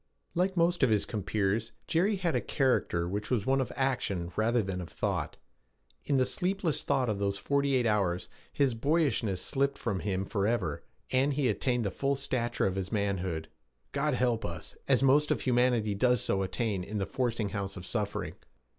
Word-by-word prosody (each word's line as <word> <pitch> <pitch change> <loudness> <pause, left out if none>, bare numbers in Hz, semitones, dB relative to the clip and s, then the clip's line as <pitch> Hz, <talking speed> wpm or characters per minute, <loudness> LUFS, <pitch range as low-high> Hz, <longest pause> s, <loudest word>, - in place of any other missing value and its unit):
Like 185 +1 0
most 175 +1 +3
of 135 - +5
his 105 -2 +2
compeers, 105 +2 -1
Jerry 190 +6 +2
had 180 -4 -1
a - - +2
character 125 - +1
which 105 +3 -3
was 115 -5 0
one 135 0 +3
of 130 - -3
action 100 -10 -1
rather 115 +1 +2
than 95 -1 -3
of 85 - -7
thought. - - -2 0.7
In 140 - +2
the 130 - +4
sleepless 180 +4 0
thought 135 -3 +1
of 105 -3 -1
those 100 0 0
forty 140 +4 +1
eight 125 -2 +2
hours 100 -5 +1 0.2
his 135 -3 +2
boyishness 115 - +1
slipped 140 0 0
from 100 -6 -2
him 95 -1 -1
forever, 100 -6 -1 0.3
and 135 +2 +3
he 135 -3 +2
attained 120 +3 0
the 100 - 0
full 140 0 0
stature 125 -3 -1
of 95 0 0
his 95 0 -3
manhood 95 -6 -1 0.4
God 145 0 0
help 120 -3 +1
us! 85 -2 -6
as 135 -1 +3
most 145 +3 +4
of - - +1
humanity 120 -4 +2
does 125 +4 +3
so 95 - 0
attain 95 0 -1
in 105 +3 -4
the 100 - 0
forcing 115 -2 -1
house 100 -1 -4
of 90 - -7
suffering! 105 0 -2
115 Hz, 185 wpm, -30 LUFS, 100-135 Hz, 0.7 s, of